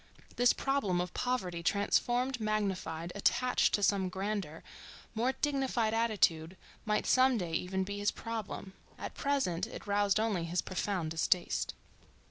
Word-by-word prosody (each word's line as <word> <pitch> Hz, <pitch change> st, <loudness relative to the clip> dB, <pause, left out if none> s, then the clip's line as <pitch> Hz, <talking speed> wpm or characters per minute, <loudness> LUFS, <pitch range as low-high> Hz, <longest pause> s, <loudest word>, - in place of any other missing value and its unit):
This 245 Hz, 0 st, +5 dB
problem 270 Hz, -10 st, 0 dB
of 180 Hz, 0 st, -3 dB
poverty 190 Hz, -9 st, -1 dB
transformed, 240 Hz, +7 st, +1 dB
magnified, 195 Hz, -6 st, -2 dB
attached 250 Hz, +5 st, +2 dB
to 205 Hz, -, -2 dB
some 195 Hz, -2 st, +2 dB
grander, 190 Hz, -4 st, -3 dB, 0.5 s
more 235 Hz, +3 st, +1 dB
dignified 265 Hz, -5 st, 0 dB
attitude 190 Hz, -7 st, +1 dB, 0.3 s
might 210 Hz, -1 st, +1 dB
some 255 Hz, -1 st, +4 dB
day 175 Hz, -5 st, -3 dB
even 190 Hz, +3 st, -1 dB
be 205 Hz, +1 st, -5 dB
his 205 Hz, +1 st, +2 dB
problem; 220 Hz, -4 st, -5 dB, 0.2 s
at -, -, -6 dB
present 270 Hz, -, 0 dB
it -, -, -9 dB
roused 205 Hz, 0 st, +2 dB
only 210 Hz, -6 st, 0 dB
his 175 Hz, +2 st, -1 dB
profound 185 Hz, -3 st, -2 dB
distaste. 170 Hz, +2 st, 0 dB
205 Hz, 135 wpm, -32 LUFS, 180-235 Hz, 0.5 s, This